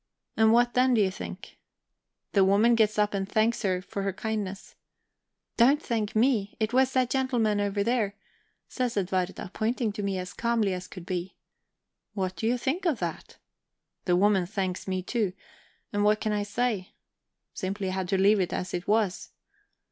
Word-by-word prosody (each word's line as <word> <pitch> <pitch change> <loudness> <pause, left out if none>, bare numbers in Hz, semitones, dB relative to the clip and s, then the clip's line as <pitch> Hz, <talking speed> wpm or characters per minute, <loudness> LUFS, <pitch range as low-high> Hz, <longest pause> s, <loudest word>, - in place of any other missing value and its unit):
And 220 0 +5
what 240 +1 +4
then, 255 0 +4
do 220 - +4
you 190 -2 +2
think? - - -9 0.7
The 195 - +4
woman 205 +5 +4
gets 220 -2 +2
up 210 0 +2
and 195 0 -2
thanks 220 +2 +1
her 185 -4 0
for 200 +1 -5
her 195 0 -1
kindness. 200 -1 -4 0.8
'Don't 265 +5 +5
thank 220 -6 -2
me 220 -3 +2
it 220 +1 -1
was 260 +1 +3
that 255 -2 +1
gentleman 245 -6 +1
there,' 205 0 0 0.5
says 250 -3 -2
Edwarda, 185 -1 -2
pointing 225 0 0
to 205 +1 -5
me 200 -1 -1
as 180 0 -5
calmly 230 -4 +1
as 180 0 -5
could 180 -3 -10
be. 180 0 -4 0.8
What 185 -2 -2
do 195 +6 -2
you 245 +2 +2
think 290 +10 -1
of 310 -7 +1
that? 170 -4 -5 0.7
The 180 - +3
woman 190 -1 +3
thanks 190 -2 -3
me 185 -1 -2
too; 210 -2 -1 0.6
and 205 0 +1
what 210 +1 +3
can 215 - -1
I 210 0 0
say? 205 -2 -2 0.6
Simply 195 -1 -3
had 185 -1 -3
to 195 - +2
leave 200 +2 +4
it 185 - 0
as 185 - -3
it 175 +1 -3
was. 210 -3 +1
205 Hz, 175 wpm, -27 LUFS, 190-235 Hz, 0.8 s, And